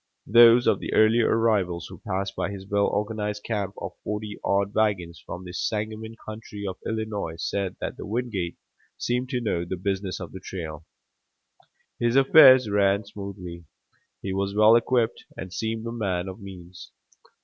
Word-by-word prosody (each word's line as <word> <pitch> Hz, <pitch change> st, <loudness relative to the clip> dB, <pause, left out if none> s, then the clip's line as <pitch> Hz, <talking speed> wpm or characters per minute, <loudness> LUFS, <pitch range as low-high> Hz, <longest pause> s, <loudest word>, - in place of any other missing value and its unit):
Those 120 Hz, +2 st, +7 dB
of -, -, +3 dB
the -, -, -5 dB
earlier 110 Hz, +2 st, +5 dB
arrivals 100 Hz, -7 st, +1 dB
who -, -, -11 dB
passed 95 Hz, -1 st, -3 dB
by 90 Hz, -, -2 dB
his 100 Hz, -1 st, -7 dB
well 100 Hz, 0 st, +1 dB
organized 105 Hz, 0 st, -2 dB
camp 105 Hz, -3 st, -3 dB
of -, -, -5 dB
forty 105 Hz, 0 st, -4 dB
odd 100 Hz, +1 st, +1 dB
wagons 95 Hz, -6 st, 0 dB
from 90 Hz, -, -7 dB
the 90 Hz, -, -8 dB
Sangamon 110 Hz, +3 st, -3 dB
country 105 Hz, -1 st, -7 dB
of 95 Hz, -1 st, -5 dB
Illinois 110 Hz, -7 st, -3 dB
said 95 Hz, +2 st, -2 dB
that -, -, -4 dB
Wingate 105 Hz, -6 st, -3 dB, 0.4 s
seemed 125 Hz, +1 st, -1 dB
to 125 Hz, -2 st, -1 dB
know 95 Hz, -7 st, -1 dB
the 90 Hz, +2 st, -4 dB
business 95 Hz, 0 st, -2 dB
of 90 Hz, -3 st, -7 dB
the 95 Hz, -, -8 dB
trail. 80 Hz, -4 st, -7 dB, 1.1 s
His 120 Hz, +1 st, +1 dB
affairs 135 Hz, -3 st, +8 dB
ran 100 Hz, 0 st, +2 dB
smoothly, 95 Hz, -4 st, -8 dB, 0.6 s
he 95 Hz, -, -2 dB
was 100 Hz, +1 st, -2 dB
well 110 Hz, +2 st, +7 dB
equipped 120 Hz, 0 st, +1 dB
and 95 Hz, -1 st, -7 dB
seemed 110 Hz, +2 st, -3 dB
a 115 Hz, -, -3 dB
man 95 Hz, -6 st, -2 dB
of 95 Hz, +3 st, -8 dB
means. 90 Hz, -2 st, -11 dB
100 Hz, 160 wpm, -25 LUFS, 95-110 Hz, 1.1 s, affairs